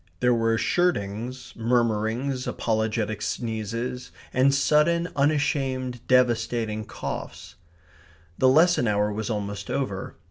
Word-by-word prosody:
There 125 0 +3
were 115 -1 +2
shirtings, 125 - -1
murmurings, 115 +2 0
apologetic 110 -1 -1
sneezes, 115 +3 -3 0.2
and 130 +2 +4
sudden 150 +5 +2
unashamed 140 -3 0
devastating 115 -3 +1
coughs. 80 -3 -6 0.9
The 130 - +5
lesson 160 -2 +4
hour 105 0 +1
was 110 +1 -3
almost 100 -2 -4
over. 100 -9 -3
120 Hz, 100 wpm, -25 LUFS, 110-130 Hz, 0.9 s, The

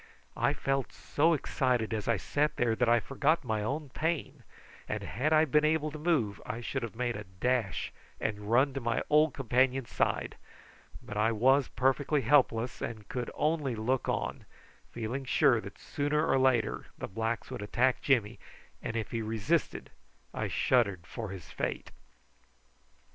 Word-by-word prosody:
I - - +2
felt 135 -1 -1
so 165 +3 +1
excited 125 -6 0
as 110 -1 -3
I 115 -2 +3
sat 145 +10 0
there 115 -2 +1
that 120 0 +2
I 120 0 +5
forgot 145 +7 +1
my 110 -4 -1
own 140 +7 -3
pain, 160 +3 -2 0.5
and - - -2
had 140 +8 -1
I 155 0 +5
been 150 +1 +3
able 155 0 +1
to 155 - -7
move 145 - 0
I 105 +2 -5
should 130 +3 -3
have 115 -2 -5
made 120 0 -1
a 105 - -5
dash 100 +1 -1 0.3
and 105 -1 -3
run 130 +4 +4
to 135 - -3
my 115 -1 0
old 150 0 +4
companion's 130 0 +1
side; - - -1 0.7
but 105 - -7
I 110 +2 +3
was 130 +4 +4
perfectly 135 +3 +1
helpless, 125 -2 +2
and 110 -3 -5
could 125 -1 -3
only 150 -5 0
look 120 +4 -1
on, - - -2 0.5
feeling 120 +4 -4
sure 130 - +3
that - - -10
sooner 150 +2 -1
or 135 - +3
later 120 -5 +1
the - - -5
blacks 115 +3 -3
would - - -5
attack 125 +5 +1
Jimmy, 120 -5 +1 0.4
and 115 - -4
if 110 -2 -3
he 115 - -2
resisted 110 -1 -1 0.4
I - - -2
shuddered 100 -9 +1
for 110 0 -6
his 95 -4 -9
fate. - - -3
125 Hz, 165 wpm, -30 LUFS, 110-140 Hz, 0.7 s, I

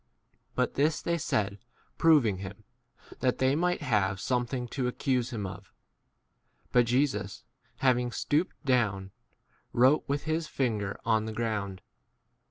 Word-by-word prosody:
But - - +1
this 150 +3 +2
they 170 0 -1
said 100 -7 -1 0.4
proving 145 - +5
him, 100 +2 -8 0.6
that 125 -1 +1
they 130 +1 +2
might 175 0 0
have 100 -7 +1
[something] 125 +2 -1
to 130 -1 -1
accuse 125 0 0
him 110 -5 -4
[of]. 95 +1 -8 1.0
But 120 -1 +4
Jesus, 120 -6 0 0.3
having 125 -2 +2
stooped 150 +8 0
down, 105 -8 +1 0.6
wrote 130 +5 +5
with 140 +1 -1
his 160 0 -1
finger 110 -9 -1
on 110 -1 +2
the 110 - -4
7 - - -11
ground. 105 -5 -2
120 Hz, 135 wpm, -29 LUFS, 105-140 Hz, 1.0 s, proving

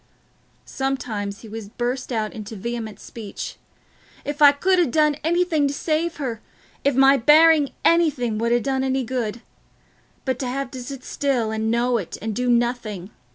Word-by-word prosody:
Sometimes 225 -7 -3
he 225 - -11
would 215 -1 -9
burst 250 +2 -2
out 220 -3 -1
into 215 0 -7
vehement 225 +1 -5
speech, 215 -4 -7 0.7
"If 290 +1 -4
I 290 -1 +9
could 365 +6 +2
ha' 345 - +3
done 300 0 +3
anything 330 -2 +2
to 280 - -3
save 325 +2 -1
her—if 265 +1 -4
my 270 +1 +6
bearing 300 +2 +6 0.2
anything 275 -10 +2
would 235 +1 0
ha' 240 0 +2
done 265 -1 0
any 265 0 0
good... 235 -2 -3 0.8
but 260 -2 -1
t' 260 - -2
have 265 +1 -3
to 260 - -7
sit 265 +1 -8
still, 250 -6 -1
and 220 0 -1
know 235 +1 +2
it, 185 - -6
and 220 0 -4
do 250 +2 0
nothing... 235 -5 0
250 Hz, 165 wpm, -23 LUFS, 225-285 Hz, 0.8 s, I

